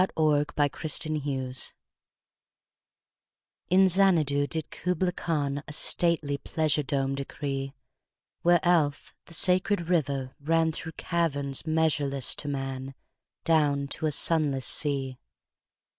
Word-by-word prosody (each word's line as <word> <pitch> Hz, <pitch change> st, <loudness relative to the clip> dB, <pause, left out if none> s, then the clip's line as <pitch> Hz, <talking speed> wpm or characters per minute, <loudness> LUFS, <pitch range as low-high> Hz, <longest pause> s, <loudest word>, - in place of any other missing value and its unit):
Kubla 150 Hz, -2 st, +3 dB, 0.3 s
Khan 155 Hz, -1 st, -1 dB, 2.5 s
IN 190 Hz, +1 st, +5 dB
Xanadu 165 Hz, -7 st, +3 dB
did 160 Hz, 0 st, -4 dB
Kubla 180 Hz, 0 st, -1 dB
Khan 145 Hz, -5 st, -2 dB
A -, -, -7 dB
stately 155 Hz, -3 st, +1 dB
pleasure 155 Hz, -1 st, 0 dB
dome 135 Hz, -1 st, -1 dB
decree: 135 Hz, 0 st, -4 dB, 0.7 s
Where 175 Hz, 0 st, +5 dB
Alph, 160 Hz, -5 st, +1 dB
the 165 Hz, -, -7 dB
sacred 180 Hz, 0 st, +2 dB
river, 140 Hz, -6 st, 0 dB
ran 160 Hz, +2 st, +2 dB
Through 160 Hz, +1 st, -7 dB
caverns 145 Hz, -5 st, -2 dB
measureless 150 Hz, -4 st, +2 dB
to 150 Hz, -, -1 dB
man 135 Hz, -1 st, -4 dB, 0.5 s
Down 145 Hz, -4 st, +2 dB
to 155 Hz, -, -1 dB
a -, -, 0 dB
sunless 145 Hz, -4 st, +1 dB
sea. 135 Hz, -4 st, -1 dB
150 Hz, 105 wpm, -27 LUFS, 140-165 Hz, 2.5 s, IN